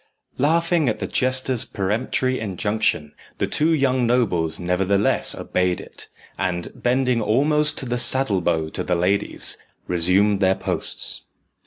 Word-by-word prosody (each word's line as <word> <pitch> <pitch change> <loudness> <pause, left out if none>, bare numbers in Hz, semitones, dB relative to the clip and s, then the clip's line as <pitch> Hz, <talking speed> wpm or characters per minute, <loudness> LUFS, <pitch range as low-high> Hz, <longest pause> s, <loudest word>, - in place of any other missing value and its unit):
Laughing 165 +1 +2
at 110 - -2
the - - -4
jester's 130 -1 +2
peremptory 115 +6 -1
injunction, 105 -6 -1 0.2
the - - 0
two 155 +2 +1
young 130 -5 +1
nobles 95 -10 0
nevertheless 95 +3 +1
obeyed 90 -1 -1
it, - - -11 0.3
and, 85 -2 -2
bending 125 -1 0
almost 150 +7 +1
to - - +1
the 120 0 -2
saddle 120 -5 +3
bow 80 -2 0
to - - -4
the 90 - 0
ladies, 90 +4 0 0.3
resumed 95 +4 +2
their 95 -1 +2
posts. - - -4
110 Hz, 135 wpm, -22 LUFS, 90-130 Hz, 0.3 s, saddle